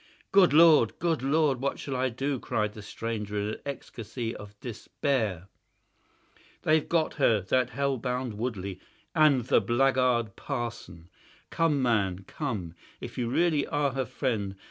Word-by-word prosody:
"Good 195 -2 +6
Lord! 155 -6 +6
Good 165 -4 0
Lord! 140 -1 +2
what 140 - -1
shall 135 - -5
I 130 +1 +1
do?" 135 +3 -2
cried 105 -2 -1
the 105 - -9
stranger, 105 -1 -4
in 100 0 -1
an 110 - -5
ecstasy 115 -3 -5
of 105 0 -11
despair. 110 - -2 1.2
"They've 155 -1 +2
got 165 -2 +1
her, 115 -5 +4
that 125 +7 +1
hellhound 125 -2 -2
Woodley 100 -6 -3 0.3
and 155 -6 +5
the - - +4
blackguard 125 -3 +2
parson. 115 - -5 0.4
Come, 150 -4 +1
man, 100 -6 +1
come, 100 - -4 0.3
if - - -7
you 120 -1 -1
really 155 +1 +2
are 145 -1 0
her 135 0 -2
friend. 110 -6 -2
125 Hz, 145 wpm, -28 LUFS, 105-140 Hz, 1.2 s, Good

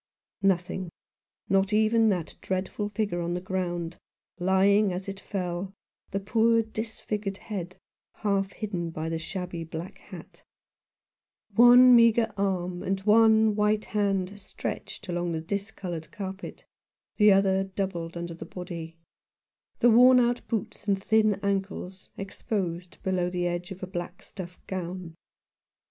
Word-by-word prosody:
Nothing 185 -1 0 0.3
— - - -67 0.2
not 195 +1 +2
even 220 +1 +4
that 180 -5 -2
dreadful 190 +2 -2
figure 205 -4 -1
on 170 +1 -2
the - - -1
ground, 175 -2 -3 0.4
lying 195 +3 +4
as 180 +2 -5
it 195 0 -5
fell, 185 -1 -4 0.3
the 195 - -2
poor 225 +3 +3
disfigured 215 -2 -4
head 185 -5 -6 0.4
half 195 -2 0
hidden 180 -6 -3
by 160 0 -4
the 165 0 -2
shabby 175 0 -5
black 165 +2 -7
hat; - - -12 1.1
one 245 +3 +8
meagre 230 -1 +5
arm 185 -3 -1
and 195 0 -1
wan 220 +1 +5
white 210 0 +2
hand 200 -2 -1
stretched 205 - -6
along 175 -1 -1
the 160 - -1
dis 200 +5 -3
coloured 175 -6 -6
carpet, 195 -2 -7 0.5
the 210 -1 +7
other 195 0 +3
doubled 185 -3 -4
under 170 0 -5
the 165 - -8
body; 165 -1 -7 0.8
the 240 - +6
worn 250 +2 +8
out 240 0 +2
boots 220 -2 -4
and 195 -1 +2
thin 215 -2 +3
ankles 195 -1 -3
exposed 185 -3 -4
below 185 -2 0
the 180 0 -2
edge 175 +1 -2
of 190 -1 -8
a - - 0
black 175 -1 -6
stuff 180 -2 -9
gown. 180 -2 -5
195 Hz, 140 wpm, -27 LUFS, 175-210 Hz, 1.1 s, one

